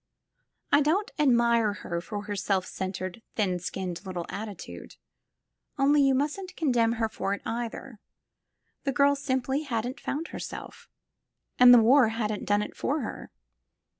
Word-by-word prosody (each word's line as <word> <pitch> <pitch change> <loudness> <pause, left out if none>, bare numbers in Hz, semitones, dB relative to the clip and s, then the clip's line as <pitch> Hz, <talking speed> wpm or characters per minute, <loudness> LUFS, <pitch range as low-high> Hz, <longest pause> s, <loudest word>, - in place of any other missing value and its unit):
I 290 - +6
don't 345 +8 +1
admire 235 -6 +3
her 170 -4 -4
for 205 +3 -6
her 205 0 -4
self 190 -1 0
cen 190 0 -4
tered, 185 +4 -6
thin 185 -5 0
skinned 180 0 -5
little 180 -3 -5
attitude, 205 -2 -8 0.8
only 285 +2 +4
you 270 -1 +4
mustn't 305 +8 -2
con 310 -5 +1
demn 230 -2 +3
her 225 -1 0
for 200 -2 -2
it, - - -13
either. 235 0 -5 0.8
The 275 - -1
girl 280 +2 +4
simply 265 0 -1
hadn't 245 -3 -3
found 315 +4 -4
herself. - - -8 0.7
And 250 0 +9
the 245 - +10
war 255 +1 +6
hadn't 215 -2 -3
done 205 0 +2
it - - -8
for 295 +2 -1
her. - - -6
235 Hz, 155 wpm, -27 LUFS, 205-275 Hz, 0.8 s, the